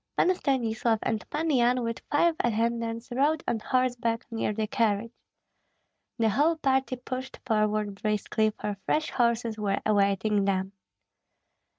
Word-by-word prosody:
Pan 370 - +4
Stanislav 240 -8 0
and 220 -2 -2
Pan 315 +2 -1
Yan 250 -1 +3
with 230 0 -3
five 330 +3 +3
attendants 230 0 -1
rode 290 +5 +1
on 235 -2 0
horseback 245 -1 0
near 225 -2 -1
the 215 +1 -1
carriage. 220 +1 0 1.0
The 225 -2 +2
whole 295 +10 +3
party 265 -4 +1
pushed 255 +1 -6
forward 215 -3 0
briskly, 215 +1 +1
for 205 -1 -3
fresh 310 0 +1
horses 235 -2 0
were 200 -2 0
awaiting 200 0 +2
them. 190 -1 0
230 Hz, 130 wpm, -27 LUFS, 215-255 Hz, 1.0 s, Pan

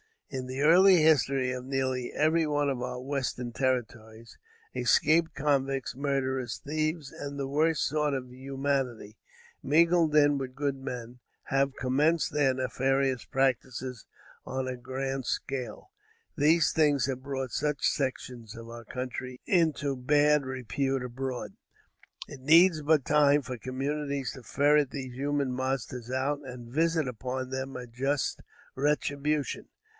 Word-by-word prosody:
In 130 -1 -4
the 130 +2 -4
early 185 +5 +7
history 135 -4 +3
of 125 0 -5
nearly 130 -2 -1
every 160 +1 +2
one 145 -1 +1
of 130 -3 -2
our 125 0 -4
western 130 -3 -3
territories, 115 -3 -3 0.3
escaped 160 +1 +3
convicts, 135 -3 0
murderers, 130 -2 -2
thieves 155 0 -2
and 140 0 -7
the 135 -1 -3
worst 155 +1 +2
sort 150 0 0
of 125 -1 -6
humanity, 135 -4 -3 0.4
mingled 165 +1 +3
in 145 -1 +5
with 130 -1 -6
good 140 -1 -1
men, 125 -2 -7 0.3
have 135 0 +1
commenced 145 +5 +1
their 145 -3 +2
nefarious 130 0 0
practices 130 -1 -1 0.4
on 130 0 -3
a 130 -1 -4
grand 135 +1 -4
scale. 135 - -4 0.5
These 155 +1 +4
things 145 -5 +3
have 130 -1 -3
brought 135 -2 -4
such 150 +4 0
sections 125 -4 -3
of 115 0 -10
our 115 0 -9
country 125 +1 -6
into 155 -6 +1
bad 145 +2 +3
repute 130 +1 -2
abroad. 125 0 -5 0.7
It 140 - -10
needs 165 +4 +5
but 150 -2 +3
time 145 -1 +4
for 125 -1 -6
communities 140 +2 -3
to 130 - -11
ferret 145 +5 +3
these 130 -3 -6
human 140 0 -1
monsters 125 -2 -3
out 135 +3 -1
and 125 -3 -9
visit 165 -1 +2
upon 130 +1 -4
them 130 0 -4
a 125 -1 -6
just 135 +4 -2 0.3
retribution. 145 +1 -1
135 Hz, 135 wpm, -29 LUFS, 130-145 Hz, 0.7 s, early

